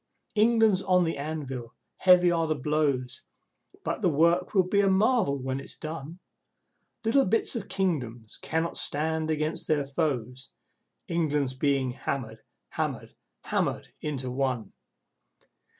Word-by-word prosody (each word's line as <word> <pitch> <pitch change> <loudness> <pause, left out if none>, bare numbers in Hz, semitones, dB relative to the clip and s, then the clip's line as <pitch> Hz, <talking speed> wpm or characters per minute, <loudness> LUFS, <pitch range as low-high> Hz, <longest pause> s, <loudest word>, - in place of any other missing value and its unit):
England's 220 -3 +4
on 180 -2 +3
the 165 -1 -1
anvil! 140 -5 -5 0.2
Heavy 180 -1 +6
are 165 -1 +1
the 155 - +1
blows! 140 -3 -1 0.6
(But - - -2
the 180 - +3
work 170 +6 +2
will 185 -2 +4
be 200 +2 +3
a 195 - +3
marvel 195 - +3
when 130 0 -3
it's 135 - -9
done.) 155 +1 -6 0.9
Little 270 +5 +4
bits 225 +6 0
of 210 -3 -4
Kingdoms 125 - -2
cannot 160 +1 -1
stand 160 +2 0
against 155 0 -1
their 150 -2 +2
foes. 135 -3 -2 0.6
England's 150 -5 0
being 135 -1 +1
hammered, 115 -3 -4 0.3
hammered, - - -3 0.3
hammered - - -1
into 135 -4 -3
one! 125 -5 -2
155 Hz, 130 wpm, -27 LUFS, 135-180 Hz, 0.9 s, Heavy